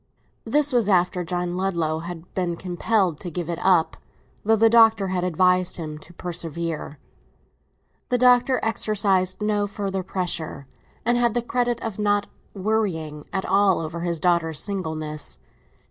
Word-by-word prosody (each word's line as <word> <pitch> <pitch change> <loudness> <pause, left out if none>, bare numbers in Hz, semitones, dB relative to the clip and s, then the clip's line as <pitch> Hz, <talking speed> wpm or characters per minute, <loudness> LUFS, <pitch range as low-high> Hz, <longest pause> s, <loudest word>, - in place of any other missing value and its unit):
This 290 -1 +2
was 235 -4 +2
after 180 -1 +2
John 175 0 -2
Ludlow 170 -4 -1
had 170 +1 -8
been 175 -2 -1
compelled 185 -1 0
to 175 - -5
give 175 0 -4
it 170 - -4
up, 180 -4 +3 0.5
though 225 +2 +4
the 225 +1 +5
Doctor 225 -3 +5
had 180 -1 -1
advised 180 +1 +2
him 155 -3 -6
to 165 - -15
persevere. 165 -3 -5 1.1
The 250 - +2
Doctor 250 +1 +4
exercised 200 -4 +1
no 210 -1 +1
further 195 -1 -3
pressure, 180 -6 -3 0.4
and 240 +1 +2
had 240 -2 +2
the 240 - +1
credit 240 0 0
of 220 -3 -4
not 205 -1 +2 0.3
"worrying" 185 -8 -2
at 190 -1 -2
all 195 0 +3
over 165 +1 -5
his 170 -1 -2
daughter's 165 -3 +1
singleness. 160 -6 -4
185 Hz, 145 wpm, -24 LUFS, 170-210 Hz, 1.1 s, the